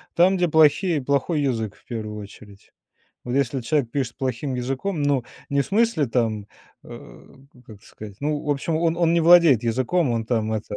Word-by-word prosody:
Там, 180 +3 +4
где 180 - +1
плохие 160 +1 +3
плохой 140 +4 0
язык 115 -7 -2
в - - -27
1 110 -3 -6
очередь. 100 0 -15 0.5
Вот 120 - -5
если 140 -1 0
человек 125 0 -1
пишет 130 -4 -3
плохим 130 0 -3
языком, 135 +7 -3
ну, 140 -4 +1 0.3
не 140 0 +1
в - - -10
смысле 205 - +1
там, 110 -4 -1 0.4
э, - - -13 0.4
как 105 -3 -14
сказать, 105 -2 -12
ну, 150 +1 -2
в 150 - -3
общем, 145 +3 -1
он 165 0 0
он 170 -1 +2
не 170 - +3
владеет 165 -8 +6
языком, 130 +7 0
он 115 -1 -1
там 110 -2 -1
это 105 -1 -4
135 Hz, 185 wpm, -23 LUFS, 115-160 Hz, 0.5 s, владеет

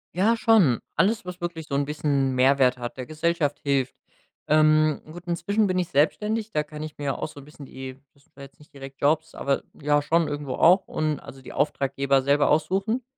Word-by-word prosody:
Ja, 220 +5 +3
schon. 205 - +4 0.2
Alles, 200 +5 +1
was 180 0 -8
wirklich 170 -2 -5
so 140 - -7
'n 140 0 +1
bisschen 145 -2 0
'n 130 - -2
Mehrwert 130 -1 +3
hat, 120 +1 -6
der 130 -1 -6
Gesellschaft 155 -2 -1
hilft. 135 -2 0 0.5
Ähm, 155 0 +3
gut, 175 +2 -11
inzwischen 180 +5 0
bin 185 -1 0
ich 175 - -1
selbstständig, 210 +9 0
da 150 - +1
kann 150 0 -8
ich 155 -1 -9
mir 145 - -5
ja 135 - -1
auch - - -4
so 145 - -12
'n 140 - -13
bisschen 150 -2 -12
die 130 0 -8 0.2
das 140 - -27
sind - - -36
zwar 140 - -12
jetzt 140 - -15
nicht 150 - -19
direkt 135 0 -11
Jobs, 155 +2 +1
aber 140 0 -1 0.2
ja 145 0 +2
schon 165 +1 +2
irgendwo 145 -3 -4
auch 180 +7 +4
und 155 -2 -2
also 135 +1 -12
die - - -11
Auftraggeber 135 -1 0
selber 140 +2 +2
aussuchen. 195 +10 0
150 Hz, 220 wpm, -25 LUFS, 140-170 Hz, 0.5 s, schon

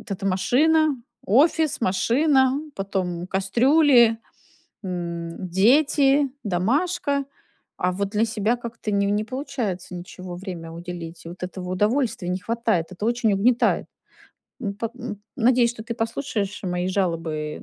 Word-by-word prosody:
от - - -17
эта 195 0 -3
машина, 295 +10 +3 0.3
офис, 305 - +3
машина, 265 +6 +3 0.2
потом 185 -3 -2
кастрюли, 235 +5 +4 0.6
м, 170 -1 -5
дети, 275 - +4
домашка, 280 - 0 0.5
а 180 0 0
вот 200 +1 -2
для 215 +1 +2
себя 225 +1 0
как-то 235 -2 -6
не 200 0 +2
не 205 +1 +1
получается 245 -9 -4
ничего 180 0 -8
время 175 -3 -7
уделить. 170 -1 -8
И - - -7
вот 175 +1 -11
этого 180 0 -5
удовольствия 220 +1 0
не 180 +1 -1
хватает, 225 -5 0
это 185 +3 -6
очень 235 -3 +2
угнетает. 230 +5 +2 0.7
Ну, 200 -4 -3
по 225 +2 -4
м, 230 -5 -7
надеюсь, 240 0 +4
что 220 -2 -8
ты 235 - -4
послушаешь 225 -3 -3
мои 180 0 -1
жалобы 165 -5 -2
210 Hz, 135 wpm, -24 LUFS, 180-250 Hz, 0.7 s, кастрюли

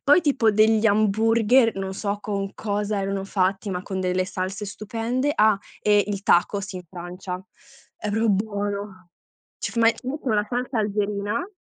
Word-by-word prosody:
poi 290 +5 +6
tipo 270 -8 +3
degli 215 +1 +4
hamburger, 225 +3 +3
non 190 0 -3
so 200 +1 -2
con 200 -1 -3
cosa 205 -1 -2
erano 195 0 -2
fatti, 195 +1 0
ma 180 -1 -3
con 190 -1 -4
delle 185 0 0
salse 195 +2 -4
stupende, 230 +7 -2
ah, 215 -7 +4 0.2
e 205 -1 +4
il 200 -1 -3
tacos 200 +3 +2
in 180 - -5
Francia. 180 +1 -6 0.5
È 210 - -4
proprio 220 +2 +1
buono. 200 -2 -3 0.5
Ci - - -4
f - - -13
ma 230 0 +6
ci 250 - -14
mettono 260 -4 -1
la 210 0 +1
salsa 245 0 -2
algerina 210 - -1
205 Hz, 165 wpm, -24 LUFS, 195-225 Hz, 0.5 s, poi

